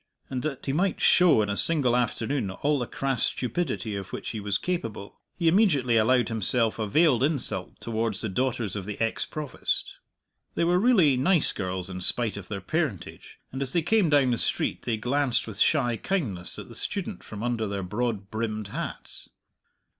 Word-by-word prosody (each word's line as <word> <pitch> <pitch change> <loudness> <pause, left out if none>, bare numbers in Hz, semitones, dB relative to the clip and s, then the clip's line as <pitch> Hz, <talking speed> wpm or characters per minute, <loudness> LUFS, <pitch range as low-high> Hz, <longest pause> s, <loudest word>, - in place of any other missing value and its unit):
And, 130 -1 -2
that 140 -2 -4
he 135 - -1
might 180 +4 +1
show 175 -12 +5
in 105 - -3
a - - -1
single 135 -3 +4
afternoon 120 -1 -1
all 145 +10 0
the 120 - -2
crass 135 -3 0
stupidity 120 -4 -2
of 95 -2 -6
which - - -5
he 110 - -4
was 100 -1 0
capable, 115 - -4 0.2
he 170 - 0
immediately 160 - +3
allowed 120 +3 +3
himself 115 +1 0
a 110 - -1
veiled 145 +1 +3
insult 130 - 0
towards 110 -3 -2
the 110 - -2
daughters 115 -1 -1
of 100 -3 -4
the 105 0 -6
ex 115 0 0
Provost. 150 -5 -3 0.6
They - - +1
were 175 +1 +3
really 185 - +4
nice 170 +4 +4
girls, 90 -2 -3
in 90 -1 -6
spite 115 +4 -1
of 100 -3 -8
their 100 -2 -5
parentage, 140 - -3
and 135 - -5
as 135 -1 -2
they 170 - +2
came 200 0 +3
down 140 -4 +4
the 120 - 0
street - - -1
they 115 -2 0
glanced 130 +3 0
with 105 -3 -7
shy 120 -2 +2
kindness 110 - -3
at - - -8
the - - -12
student - - -4
from 105 0 -7
under 120 -3 -1
their 100 -1 -3
broad 105 +1 -3
brimmed 110 -2 -3
hats. - - -6
120 Hz, 190 wpm, -26 LUFS, 105-145 Hz, 0.6 s, show